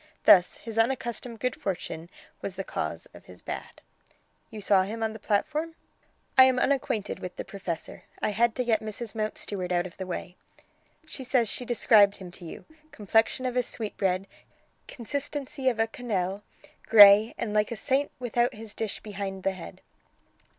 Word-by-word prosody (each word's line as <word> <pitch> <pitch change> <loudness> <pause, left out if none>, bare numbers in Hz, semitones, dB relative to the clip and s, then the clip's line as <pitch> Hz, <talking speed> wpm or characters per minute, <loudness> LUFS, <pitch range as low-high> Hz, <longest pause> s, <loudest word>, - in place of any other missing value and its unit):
Thus 180 -2 +6
his 225 -1 -5
unaccustomed 235 -1 -1
good 250 -2 -1
fortune 170 -3 -5 0.3
was 190 - -4
the 195 - -4
cause - - -4
of - - -15
his - - -14
bad." - - -7 0.7
"You 220 - -8
saw 200 -1 +4
him 220 +4 -3
on 220 -1 -1
the 220 - -9
platform?" 300 +11 -1 0.6
"I 260 - +11
am 260 -1 +3
unacquainted 265 -5 0
with 180 - -7
the - - -6
professor. 185 -5 -6
I - - 0
had 225 +2 +2
to 255 - 0
get 225 -2 +2
Mrs 220 +1 -6
Mountstuart 205 -4 -3
out 175 0 +1
of 180 - -10
the 190 - -5
way." 180 0 -6 0.7
"She 295 -3 -8
says 245 -3 +2
she 250 - -2
described 215 -4 +4
him 180 -2 -10
to 175 - -10
you. 160 - -9 0.3
'Complexion 225 +4 +1
of 250 -1 -2
a 250 - +3
sweetbread, 195 -5 -2 0.6
consistency 285 +2 -2
of 240 - -2
a 225 - +3
quenelle, 205 -5 -3 0.5
grey, 210 0 +8
and 220 -3 -3
like 210 +1 +1
a - - -2
Saint 270 +6 0
without 245 -1 0
his 215 -1 -8
dish 220 -3 -3
behind 195 -2 -6
the 195 - +2
head.'" 185 -3 -10
220 Hz, 170 wpm, -27 LUFS, 195-245 Hz, 0.7 s, I